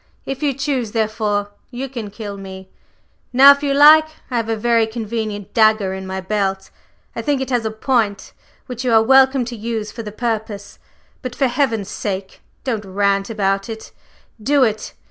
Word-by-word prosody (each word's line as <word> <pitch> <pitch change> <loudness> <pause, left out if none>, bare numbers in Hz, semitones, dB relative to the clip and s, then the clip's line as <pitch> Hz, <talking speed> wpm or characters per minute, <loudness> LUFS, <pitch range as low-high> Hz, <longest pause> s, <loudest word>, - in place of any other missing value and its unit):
If 270 +1 -5
you 285 -3 0
choose, 265 -5 -2
therefore, 210 -2 -1 0.2
you 260 +2 -5
can 235 -5 -6
kill 205 0 -7
me, 190 -1 -10 0.6
now, 270 +3 +9
if 280 0 +1
you 285 -1 0
like! 305 +3 +7 0.2
I 245 - 0
have 225 -1 -2
a 225 - +1
very 230 0 +2
convenient 220 -2 -5
dagger 215 -3 +3
in 190 0 -6
my 190 0 -4
belt 195 -1 -2 0.4
I - - -3
think 290 -2 0
it 265 0 -4
has 240 -3 0
a - - 0
point 220 -2 -1 0.3
which 250 -1 -6
you 250 - 0
are 220 0 +6
welcome 265 +1 +4
to 240 0 -6
use 220 -1 -4
for 230 - -7
the 210 -2 -7
purpose; 220 -2 -4 0.4
but, 255 -2 -6
for 275 - +1
heaven's 240 -6 0
sake, 195 -2 -5 0.2
don't 230 -5 -2
rant 195 +1 0
about 195 -1 -1
it 220 -1 -8 0.5
do 280 +4 +3
it! 215 -3 -2
225 Hz, 185 wpm, -19 LUFS, 205-255 Hz, 0.6 s, now